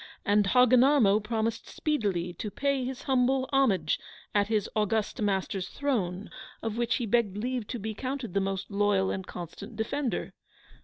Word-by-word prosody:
And 205 0 +3
Hogginarmo 250 -2 +5
promised 225 +1 -2
speedily 200 - -1
to 210 - -3
pay 280 +3 0
his 255 0 -5
humble 260 0 +2
homage 270 -9 +2 0.3
at 205 -1 +3
his 215 -2 0
august 215 0 0
master's 195 -1 -1
throne, 210 -9 -2 0.3
of 225 -1 -2
which 235 0 +1
he 245 - -1
begged 215 -3 +1
leave 245 0 -2
to 245 - -4
be 220 0 -4
counted 255 -2 -4
the 200 - +2
most 195 +1 -3
loyal 200 -1 +2
and 190 -1 -4
constant 190 +6 -8
defender. 250 +4 -2
220 Hz, 155 wpm, -29 LUFS, 200-255 Hz, 0.3 s, Hogginarmo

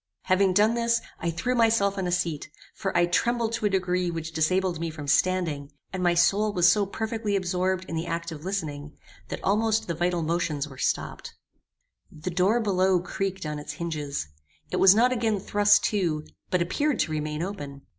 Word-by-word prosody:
Having 190 0 +3
done 215 +3 +4
this, 235 0 +1 0.2
I 170 - -1
threw 165 +10 -1
myself 225 -4 +3
on 190 -2 -2
a - - -1
seat; 170 -5 -1 0.2
for 195 -4 -2
I 175 - +5
trembled 230 +5 0
to 215 - 0
a - - 0
degree 180 -2 0
which 165 -1 -4
disabled 175 +2 +1
me 165 0 -2
from 155 -2 -8
standing, 155 -2 +1 0.2
and 185 - -3
my 175 -1 +3
soul 200 +5 +3
was 175 -2 +4
so 205 0 +4
perfectly 220 0 -2
absorbed 185 0 0
in 165 - -5
the 165 +1 -3
act 165 0 -3
of 155 -2 -8
listening, 150 -6 -4 0.3
that - - -6
almost 220 +2 +1
the 170 - -1
vital 175 +1 0
motions 160 -3 -1
were 135 -3 -12
stopped. - - -2 0.8
The 155 +4 -6
door 190 +6 +2
below 190 -4 +2
creaked 190 +1 -4
on 150 -1 -3
its 145 - -6
hinges. 150 - -4 0.4
It - - -1
was 190 +1 +7
not 245 +3 +4
again 225 -4 0
thrust 205 +2 +3
to, 165 -7 0 0.2
but 180 -1 +2
appeared 285 - 0
to 155 - -1
remain 150 +1 -2
open. 145 -8 -6
180 Hz, 190 wpm, -26 LUFS, 165-200 Hz, 0.8 s, was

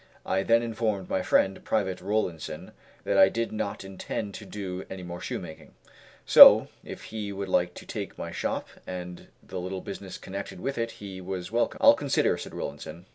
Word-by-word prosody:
I 95 - +1
then 115 +3 +3
informed 110 -4 -2
my 95 - +1
friend, 95 +1 +2
Private 95 -4 -1
Rollinson, 95 -5 -3 0.3
that - - +1
I 95 - +8
did 115 +3 -2
not 100 -2 -4
intend 95 +2 -5
to 100 - -9
do 95 -2 -5
any 95 -1 -7
more 90 0 -7
shoemaking; 80 - -7 0.5
so, - - +10
if - - -9
he 105 -2 -5
would 100 0 -4
like 90 -1 +1
to - - -10
take - - -6
my - - -5
shop - - -3 0.2
and 90 -1 -7 0.2
the 95 - -6
little 95 +1 -4
business 95 -1 -7
connected 100 -1 -7
with 135 +5 -3
it 115 0 -1
he 95 -2 -9
was 95 +1 -5
welcome. 120 +1 0
"I'll - - +8
consider," - - +1
said - - -8
Rollinson. 85 +3 -7
95 Hz, 185 wpm, -27 LUFS, 90-105 Hz, 0.5 s, so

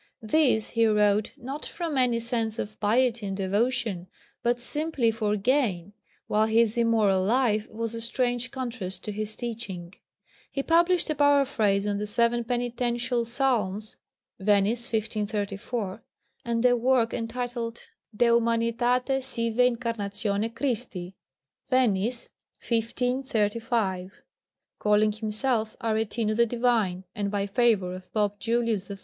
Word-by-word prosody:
These 230 -3 +2
he 230 -1 +3
wrote, 210 -1 +3
not 270 +5 -6
from 335 -4 -4
any 250 -3 +2
sense 230 -1 -2
of 215 -1 -5
piety 230 0 +2
and 195 0 -3
devotion, 205 -1 0 0.3
but 240 0 +1
simply 280 -1 0
for 215 -2 0
gain, 205 -5 0 0.3
while 215 +1 +2
his 225 0 +3
immoral 220 -5 +3
life 220 0 +1
was 230 +1 -4
a 230 - -5
strange 245 +1 -1
contrast 230 -9 -5
to 210 - -4
his 215 +1 -3
teaching. 205 -7 -6 0.6
He 275 - -2
published 340 +1 +3
a - - +2
Paraphrase 275 -9 +3
on 205 -1 -1
the 210 - -3
seven 235 +2 +2
Penitential 245 0 -1
Psalms 225 -5 -1 0.4
(Venice, 210 +4 +2
1534), 210 -1 -2 0.4
and 235 0 0
a 245 0 +6
work 245 -1 +2
entitled 235 0 -4 0.3
De 240 - +3
humanitate 235 +3 +2
sive 230 -3 -2
incarnatione 225 -4 0
Christi 210 -9 -3 0.5
(Venice, 240 -2 +1 0.4
1535), 230 -5 -1 0.6
calling 210 0 +3
himself 220 +1 -1
Aretino 220 -1 -1
the 235 +1 +3
divine, 225 -6 +1
and 205 -1 -2
by 200 -1 -1
favour 205 -4 +2
of 185 0 -10
Pope 205 -1 0
Julius 230 -4 0
III. 200 - -5
230 Hz, 125 wpm, -27 LUFS, 210-245 Hz, 0.6 s, a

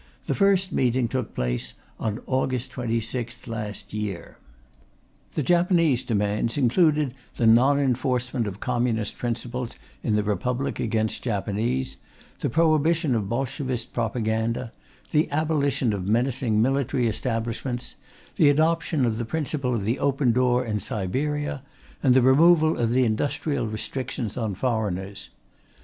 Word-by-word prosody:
The - - 0
first 195 -2 +2
meeting 125 -1 +2
took 125 0 -3
place - - -2 0.2
on 110 0 -2
August 130 -1 -1
26th 115 0 -3
last 110 -4 -5
year. 105 -4 -5 0.9
The 150 - -1
Japanese 170 -5 +3
demands 105 +2 0
included 145 +1 +3 0.2
the 120 - +1
non 125 +5 +6
enforcement 125 -3 0
of 100 0 -6
communistic 120 -4 -1
principles 120 +1 -3 0.3
in 110 - 0
the 105 - +2
Republic 125 +5 -1
against 110 -1 0
Japanese, 105 - -1 0.4
the - - -1
prohibition 160 -1 +2
of 105 -4 -1
Bolshevist 130 -1 -2
propaganda, 115 0 -1 0.4
the 155 +1 +2
abolition 145 -5 +1
of 95 -2 -3
menacing 120 0 +1
military 130 0 +1
establishments, 115 +2 -3 0.4
the 150 - +6
adoption 155 -1 +2
of 115 -1 -1
the - - -1
principle 140 -1 -2
of 100 -4 -2
the 115 +5 0
open 135 -2 +2
door 125 +1 +2
in 105 -2 -1
Siberia, 140 +10 -2 0.4
and 130 -3 +4
the 130 - +5
removal 155 +4 +5
of 120 +1 +1
industrial 130 +3 0
restrictions 110 0 -4
on 110 -5 -2
foreigners. 100 -4 -2
125 Hz, 130 wpm, -25 LUFS, 110-140 Hz, 0.9 s, non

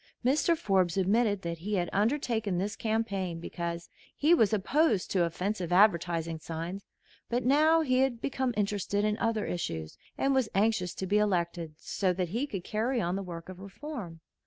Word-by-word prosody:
Mr. 305 +6 +3
Forbes 190 - +1
admitted 205 +1 +2
that 170 -1 -4
he 205 +5 -2
had 175 -2 0
undertaken 220 -3 0
this 200 +3 -2
campaign 200 -6 -2
because 170 0 -5 0.3
he 310 +4 +4
was 225 - +4
opposed 220 - +1
to 185 -3 +3
offensive 180 +1 -3
advertising 170 -4 +3
signs; 170 +5 -6 0.4
but 240 +1 -1
now 310 +5 +5
he 255 -4 +2
had 260 -3 +1
become 260 0 -1
interested 205 0 0
in 210 0 +1
other 225 -2 0
issues, 80 - -4 0.2
and 275 0 +2
was 260 -4 +2
anxious 195 -3 +1
to 190 - -3
be 205 +3 +2
elected 170 -5 -1
so 185 +3 -1
that 180 -1 -2
he 240 - -1
could 195 -9 -5
carry 230 +6 -1
on 175 -2 -1
the 195 - -2
work 170 -3 -7
of 185 -1 -9
reform. 200 - -8
200 Hz, 175 wpm, -29 LUFS, 175-230 Hz, 0.4 s, now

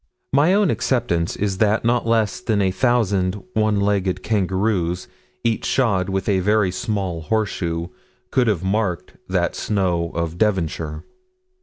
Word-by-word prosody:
My 150 +7 +4
own 205 -5 +3
acceptance 85 -10 0
is 100 -1 -2
that 110 +1 +2
not 120 0 +1
less 110 -3 +1
than 110 -3 0
a 95 -2 +2
thousand 100 -5 +1 0.2
one 110 -2 +2
legged 100 -2 0
kangaroos, 95 -3 0 0.4
each 115 -2 0
shod 100 -8 +1
with 95 -1 -2
a 100 -3 +2
very 105 0 +2
small 95 -4 -2
horseshoe, 85 -2 -1 0.4
could 125 -2 +2
have 100 -5 +1
marked 95 -2 -1 0.2
that - - 0
snow 90 -5 0
of 85 +1 -3
Devonshire. 80 -6 -1
100 Hz, 140 wpm, -21 LUFS, 90-110 Hz, 0.4 s, My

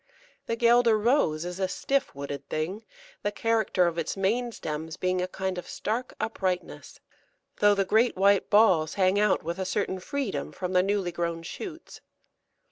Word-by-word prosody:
The 230 - 0
Guelder 235 -1 +4
Rose 210 - +2
is 180 +1 -5
a 190 - +1
stiff 275 - -1
wooded 140 0 -6
thing, 180 +8 -3 0.4
the 205 - -1
character 220 -4 +1
of 170 -1 -1
its 165 - -3
main 235 +6 0
stems 160 -5 -5
being 185 0 0
a 180 - -1
kind 190 0 -3
of - - -9
stark 235 +4 -3
uprightness, 185 -5 -3 0.6
though 205 0 +5
the 195 -1 +1
great 225 +5 +3
white 200 0 +3
balls 185 -7 +4
hang 190 +1 +3
out 210 -2 +2
with 170 +3 -4
a - - 0
certain 190 0 -2
freedom 220 - -3
from 180 0 -4
the 180 - +5
newly 195 -2 0
grown 170 -1 -3
shoots. 330 - -8
190 Hz, 170 wpm, -27 LUFS, 175-220 Hz, 0.6 s, though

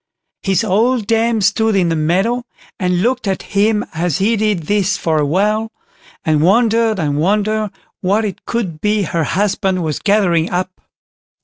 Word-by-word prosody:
His 190 -3 +1
old 225 +4 +1
dame 225 0 +1
stood 220 +2 +2
in 180 -3 +2
the 165 - 0
meadow 190 +10 0 0.4
and 180 -1 0
looked 250 -1 0
at 190 - -2
him 210 +1 +2
as 165 -1 -1
he 215 +4 +2
did 210 -5 0
this 200 +3 0
for 160 -2 0
a 150 - +1
while, 210 +7 0 0.5
and 155 -2 +2
wondered 225 +4 +3
and 145 -5 -1
wondered 210 +4 +1 0.3
what 205 +4 +1
it 200 - -5
could 190 -10 -3
be 210 0 +1
her 165 -2 -1
husband 190 0 0
was 155 -2 -2
gathering 185 -6 +2
up. 185 +1 -3
200 Hz, 165 wpm, -17 LUFS, 175-220 Hz, 0.5 s, wondered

